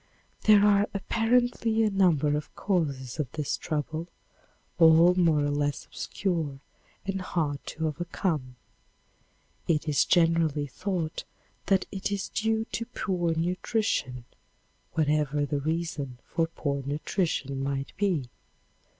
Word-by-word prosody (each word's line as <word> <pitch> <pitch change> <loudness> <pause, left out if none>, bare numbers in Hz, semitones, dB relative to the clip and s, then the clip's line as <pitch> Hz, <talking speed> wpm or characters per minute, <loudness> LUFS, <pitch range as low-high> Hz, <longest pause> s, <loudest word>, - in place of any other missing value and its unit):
There 210 -1 +7
are 205 0 +4
apparently 225 +1 +2
a 215 - +2
number 165 -7 +3
of 150 - -5
causes 140 - -1
of 135 -5 -2
this 150 -3 -1
trouble, 155 +2 -3 0.7
all 165 +2 +7
more 165 -5 +3
or 145 - 0
less 145 0 -1
obscure 165 -8 -3 0.5
and 195 -1 -2
hard 155 -6 -2
to 160 - -3
overcome. 155 -4 -2 1.1
It 160 -1 +1
is 150 -2 +3
generally 165 -4 +3
thought 170 +3 -3 0.4
that 195 -1 +3
it 195 0 -3
is 200 -1 -2
due 220 0 0
to 230 - -3
poor 175 -4 -1
nutrition, 175 - -1 0.7
whatever 150 -2 +1
the 145 0 -1
reason 155 -4 -3
for 165 -2 0
poor 140 -4 -3
nutrition 140 -1 -2
might 135 0 -3
be. 185 -10 0
165 Hz, 120 wpm, -28 LUFS, 145-190 Hz, 1.1 s, There